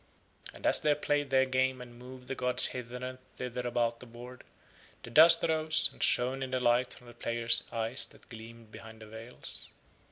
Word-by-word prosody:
And - - -9
as - - +8
they 150 -1 +1
played 145 -1 -1
their 130 0 +3
game 130 0 -1
and 125 -1 -11
moved 125 0 -12
the - - -3
gods 125 -1 +1
hither 125 0 -7
and 130 0 -8 0.2
thither 125 0 -5
about 120 -1 -1
the 125 - -12
board, 120 +2 -12 0.6
the 120 - -10
dust 165 +5 +6
arose, 155 -1 +1
and - - -16
shone 130 +2 +2
in 130 - -4
the 130 0 -2
light 120 0 +1
from 125 - -17
the 120 - -13
players' 115 0 +2
eyes 115 +3 0
that - - -20
gleamed 115 -1 -12
behind 110 0 -12
the - - -11
veils. 110 +3 -9
125 Hz, 195 wpm, -30 LUFS, 115-130 Hz, 0.6 s, as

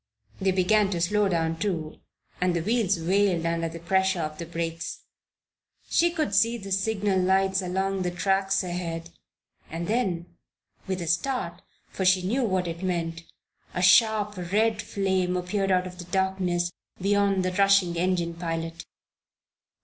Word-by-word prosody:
They 190 - +1
began 195 +2 +3
to 180 -4 -2
slow 205 +4 +2
down, 165 -2 0
too, 165 -7 -3 0.4
and 180 -1 +2
the 170 - -1
wheels 215 -3 +1
wailed 180 0 +2
under 165 0 0
the 165 - -8
pressure 190 +2 +1
of 155 -1 -5
the 170 - -5
brakes. 165 0 -4 0.9
She 345 - +3
could 310 -10 -2
see 230 +4 +3
the 195 -3 -9
signal 195 0 +1
lights 190 +1 +2
along 190 +1 -1
the 180 - 0
tracks 195 +2 +1
ahead 170 -2 -4 0.6
and 165 +1 -4
then 195 -7 0 0.6
with 185 -2 -2
a - - -6
start, 175 -1 -1 0.3
for 190 - -3
she 185 0 +4
knew 240 +8 +1
what 185 -5 0
it 170 +1 -5
meant 165 -3 -2 0.5
a 180 - 0
sharp 210 +1 +4
red 220 +1 +2
flame 190 -2 0
appeared 195 +2 -1
out 185 -1 +2
of 180 0 -9
the 175 - -7
darkness 180 -2 0 0.3
beyond 200 -1 +2
the 185 - 0
rushing 195 -2 +4
engine 175 -1 0
pilot. 165 0 -5
185 Hz, 155 wpm, -26 LUFS, 170-195 Hz, 0.9 s, she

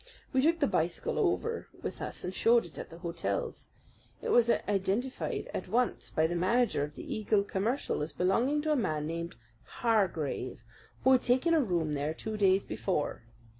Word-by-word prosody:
We 260 - +4
took 330 +4 +3
the 290 - +4
bicycle 170 - 0
over 460 0 0 0.2
with - - -5
us - - -5
and 180 - -3
showed 230 +3 +4
it 165 - -11
at - - -7
the 165 - -11
hotels. 175 - -3 0.6
It - - -2
was 235 -1 +5
identified 205 +5 0
at - - -4
once 245 +1 0
by 160 - +2
the 165 - 0
manager 190 -1 +2
of 150 +1 -6
the - - -8
Eagle 215 -1 +1
Commercial 205 - -1
as 150 - -2
belonging 245 +11 +1
to 310 - +1
a - - +4
man 155 - 0
named 170 0 -4 0.3
Hargrave, 170 - -1 0.4
who 260 - +5
had 255 -1 +6
taken 260 +7 +3
a 320 - +5
room 170 - 0
there 145 +2 -1
two 220 +4 -5
days 195 -2 +3
before. 150 -10 -2
200 Hz, 180 wpm, -31 LUFS, 170-250 Hz, 0.6 s, had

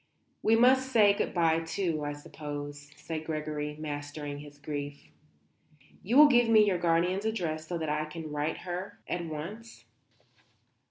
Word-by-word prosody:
"We 220 - +4
must 260 +3 +4
say 210 -4 +6
good - - -1
bye, 165 -2 +3
too, 165 -1 -2
I 145 0 -2
suppose," 145 0 -7
said 160 -1 -5
Gregory, 150 -1 -3
mastering 145 -1 -5
his 145 0 -12
grief. 145 -1 -6 0.9
"You 230 +7 +1
will 300 0 +10
give 240 -4 +4
me 215 -2 +7
your 190 -4 +1
guardian's 175 +4 +1
address 165 -8 -2
so 175 - -2
that 160 -1 -3
I 150 +1 0
can 155 0 -7
write 150 +2 -1
to - - -11
her 180 +2 -5
at 175 - -2
once?" 170 +9 -7
160 Hz, 160 wpm, -30 LUFS, 150-200 Hz, 0.9 s, will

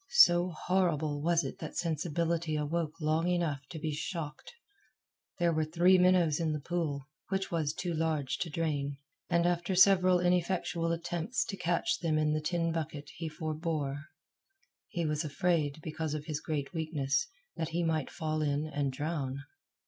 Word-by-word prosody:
So 180 - +6
horrible 160 -4 0
was 170 +1 +3
it - - -6
that - - -6
sensibility 165 0 0
awoke 155 +2 -2
long 155 +2 +1
enough 170 -5 +1
to 165 - -7
be 155 0 -2
shocked. 150 0 -5 0.9
There 170 -1 +2
were 155 0 +2
three 175 +4 +4
minnows 180 -4 +4
in 160 -2 0
the 150 - -2
pool, 145 -3 -2 0.2
which 195 0 -1
was 160 -4 0
too 175 +2 -3
large 155 -4 -1
to 170 - -2
drain; 145 -3 -1 0.3
and 170 -1 +3
after 175 +1 +1
several 185 -1 +6
ineffectual 175 -1 +1
attempts 175 +6 -1
to 195 - -4
catch 175 -1 0
them 160 -3 +1
in 155 0 +2
the 155 - 0
tin 165 +1 0
bucket 150 -3 -4
he 165 -1 -3
forbore. 155 -3 -3 0.8
He 170 -2 -2
was 150 +1 0
afraid, 155 -1 0
because 155 -1 -3
of 150 -1 -5
his 155 -2 -2
great 145 -2 -3
weakness, 160 - 0 0.3
that 160 -1 -2
he 170 +1 -1
might 160 -3 0
fall 155 -1 -2
in 145 0 0
and 145 -3 -1
drown. 140 -1 -3
160 Hz, 165 wpm, -31 LUFS, 150-175 Hz, 0.9 s, So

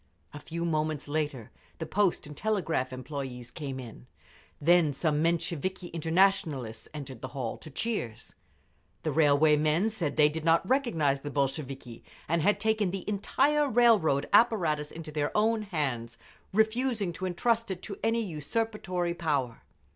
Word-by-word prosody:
A 145 - -7
few 170 +3 -4
moments 155 -3 -1
later 145 -6 -2 0.3
the 160 - -4
Post 195 +2 +1
and 150 0 -9
Telegraph 165 -10 -1
Employees 130 -2 -6
came 135 -4 -5
in; 110 - -10 0.5
then 165 -1 +4
some 150 +1 0
Mensheviki 170 +2 -1
Internationalists 160 - +1
entered 135 -5 -8
the 130 - -4
hall, 120 -4 -2
to 155 - -10
cheers. 140 - -3 0.7
The 155 - 0
Railway 150 0 +4
men 155 +8 +2
said 170 -9 -3
they 150 - +7
did 155 +1 -4
not 165 0 +3
recognise 165 - +1
the 145 - -5
Bolsheviki 135 -3 -3 0.2
and 165 +1 +1
had 205 +6 +3
taken 220 -3 +1
the 190 0 -5
entire 280 +8 +2
railroad 215 - +4
apparatus 170 -10 +3
into 160 -1 -8
their 150 -1 -1
own 220 +1 +2
hands, 135 - -3 0.3
refusing 220 -2 +1
to 185 +3 -4
entrust 230 +6 0
it 185 -1 -5
to 200 - -6
any 225 0 +1
usurpatory 180 +1 -2
power. 140 -8 -1
160 Hz, 145 wpm, -29 LUFS, 145-200 Hz, 0.7 s, they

